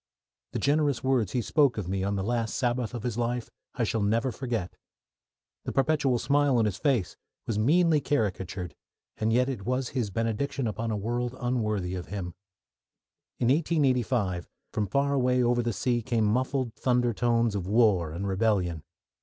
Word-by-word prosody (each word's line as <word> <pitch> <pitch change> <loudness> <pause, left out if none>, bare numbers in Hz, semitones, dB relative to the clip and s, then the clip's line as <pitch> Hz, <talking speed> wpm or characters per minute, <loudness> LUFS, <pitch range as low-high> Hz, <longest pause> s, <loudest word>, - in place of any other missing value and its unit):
The - - -1
generous 145 -2 +1
words 130 -7 +1
he 125 - 0
spoke 140 - +3
of 100 -5 -3
me 95 0 -1
on 100 +1 0
the 95 - -1
last 115 0 -1
Sabbath 125 -2 -1
of 115 - -5
his 120 -2 -2
life 120 0 -2 0.2
I 125 - 0
shall 110 +1 0
never 115 +5 +1
forget. 115 -6 -3 0.9
The - - -4
perpetual 135 -2 +2
smile 140 0 +2
on 115 - +3
his 105 -4 -1
face 130 - 0 0.3
was 105 -2 -1
meanly 155 +5 +4
caricatured, 95 - -2 0.4
and 110 +1 0
yet 125 +2 +3
it 130 -7 -4
was 125 +3 -1
his 120 -6 -2
benediction 115 +6 -1
upon 115 +1 -2
a 110 - -1
world 120 +4 -2
unworthy 110 -7 -1
of 90 -1 -5
him. 90 -3 -5 1.0
In 120 - +1
1885, 125 - +1 0.3
from 105 -2 0
far 140 +6 +1
away 125 -2 +2
over 120 0 +2
the 120 0 -1
sea 120 +4 0
came 115 -2 0
muffled 130 +2 0
thunder 120 +1 +1
tones 115 0 +1
of 95 -3 -3
war 105 -6 +3
and 95 +5 -4
rebellion. 95 -5 +1
120 Hz, 170 wpm, -28 LUFS, 105-130 Hz, 1.0 s, meanly